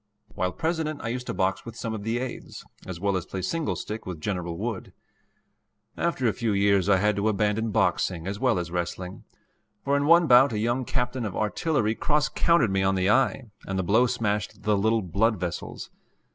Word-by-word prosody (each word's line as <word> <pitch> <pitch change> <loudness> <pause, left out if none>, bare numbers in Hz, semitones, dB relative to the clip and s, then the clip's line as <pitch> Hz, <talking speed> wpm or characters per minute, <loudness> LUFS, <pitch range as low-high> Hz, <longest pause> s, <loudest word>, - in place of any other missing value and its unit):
While 90 0 -1
President 160 - -2
I 115 - -2
used 125 +1 -4
to - - -2
box 95 +1 0
with 115 -1 -9
some 115 -1 -4
of 110 - -5
the 115 +3 -1
aides, 125 0 -6 0.2
as 90 -3 -6
well 100 +1 0
as 90 0 -3
play 95 -1 -5
single 165 - -1
stick 110 +1 -6
with 90 -4 -6
General 85 -1 -3
Wood. - - -4 1.0
After 170 -7 -1
a 110 - +2
few 115 -3 -1
years 100 -1 +3
I 100 - +5
had 105 +2 +2
to 105 +2 +1
abandon 105 +2 0
boxing 90 -4 0
as 100 +1 -4
well 125 -5 +2
as 85 -1 -3
wrestling, 90 +1 -4 0.6
for 140 +1 +2
in 140 0 +1
one 170 +1 +6
bout 130 -1 +6
a - - -1
young 120 +4 0
captain 125 0 -2
of 105 -4 -4
artillery 110 +1 0
cross 150 +4 +1
countered 165 - +2
me 95 0 +1
on 95 0 +2
the 95 +2 +2
eye, 130 -1 +1 0.2
and 95 - -2
the 95 - 0
blow 110 +8 +3
smashed 105 -5 -2
the 105 -1 +2
little 110 +2 +1
blood 100 +5 +1
vessels. 90 -1 -5
110 Hz, 205 wpm, -26 LUFS, 95-125 Hz, 1.0 s, one